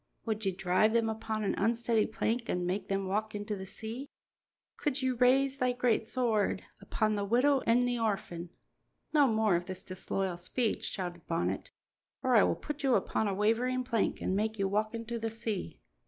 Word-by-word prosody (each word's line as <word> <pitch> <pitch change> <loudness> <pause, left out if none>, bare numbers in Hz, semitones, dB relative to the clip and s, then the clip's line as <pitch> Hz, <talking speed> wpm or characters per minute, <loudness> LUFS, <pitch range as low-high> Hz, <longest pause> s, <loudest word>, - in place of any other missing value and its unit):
Would 220 -1 -2
ye - - +3
drive 185 +4 +2
them 230 -1 +2
upon 220 0 -3
an 200 - +1
unsteady 230 +1 +2
plank 225 +2 -1
an' 180 0 0
make 185 +3 -2
them 195 0 -1
walk 210 +3 -1
into 205 0 -3
the 190 -1 -7
sea? 225 +7 -6 0.7
Could 285 -2 -1
ye 260 - +2
raise 265 +2 +3
thy 250 -1 +2
great 245 -3 +1
sword 225 -7 +1 0.2
upon 215 +2 0
the 205 -1 -1
widow 250 +7 +3
an' 240 +2 +4
the 245 -1 0
orphan?" 185 -6 -2 0.6
"No 290 -3 +6
more 220 -4 +3
of 175 +1 -1
this 185 0 -6
disloyal 185 0 -2
speech," 215 +6 -1
shouted 175 -3 -5
Bonnet, 165 0 -1 0.5
"or 255 -1 +3
I 215 - +8
will - - +3
put 295 -1 -6
you 265 -4 +3
upon 220 - +1
a 195 - -1
wavering 240 +5 +1
plank 230 -4 0
and 190 - 0
make 215 +2 0
you 195 -1 +1
walk 215 +3 0
into 230 +1 -4
the 225 0 -2
sea." 220 - -4
220 Hz, 190 wpm, -31 LUFS, 195-240 Hz, 0.7 s, I